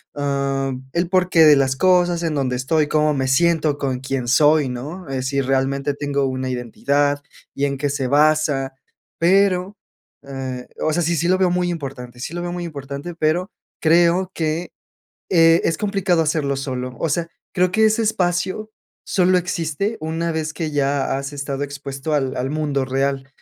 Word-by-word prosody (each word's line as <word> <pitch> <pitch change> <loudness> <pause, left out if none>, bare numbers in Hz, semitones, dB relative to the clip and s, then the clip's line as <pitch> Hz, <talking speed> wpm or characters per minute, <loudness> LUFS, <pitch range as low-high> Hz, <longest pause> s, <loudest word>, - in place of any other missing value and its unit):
Ah, 140 -1 -1 0.2
el 170 +1 +1
porqué 180 -3 +4
de 150 -1 +8
las 135 -1 +2
cosas, 175 +1 +3
en 165 -2 0
donde 130 -3 0
estoy, 150 +4 +1
cómo 150 0 +2
me 135 -2 -1
siento 155 +1 +2
con 130 -3 -2
quién 135 -2 -3
soy, 150 +2 +4
¿no?, 150 +9 -6
eh, 135 -1 -2
si 140 +1 -1
realmente 135 +1 0
tengo 140 -1 -1
una 130 0 -2
identidad 140 +4 0 0.3
y 140 - 0
en 140 -1 -2
qué 145 +1 -1
se 135 -2 -1
basa, 145 -1 +2 0.5
pero, 190 +2 +2 0.5
eh, 130 -2 -5
o 155 - +1
sea, 175 - +1
sí, 170 +2 +1
sí, 165 +2 0
lo 185 +1 +3
veo 185 -2 +3
muy 180 0 0
importante. 130 -7 -6
Sí, 140 - -5
lo 175 - -3
veo 175 0 -3
muy 175 0 -4
importante, 140 +1 -6
pero 170 +4 0 0.3
creo 175 +3 +3
que, 160 +2 -2 0.6
eh, 165 -2 +5
es 165 - +1
complicado 195 -4 +1
hacerlo 150 -3 0
solo. 130 -2 -4
O 165 - 0
sea, 170 +3 -1 0.3
creo 180 0 +2
que 220 +3 +3
ese 220 +1 +2
espacio 190 +1 -1 0.4
solo 185 -1 +3
existe 180 +4 -2
una 165 +2 -2
vez 155 -1 -2
que 160 -2 -3
ya 140 -1 0
has 140 +1 -6
estado 140 0 -3
expuesto 140 +1 -5
al 135 -3 0
al 125 +1 -1
mundo 145 -3 -1
real 135 0 -1
150 Hz, 175 wpm, -21 LUFS, 135-170 Hz, 0.6 s, de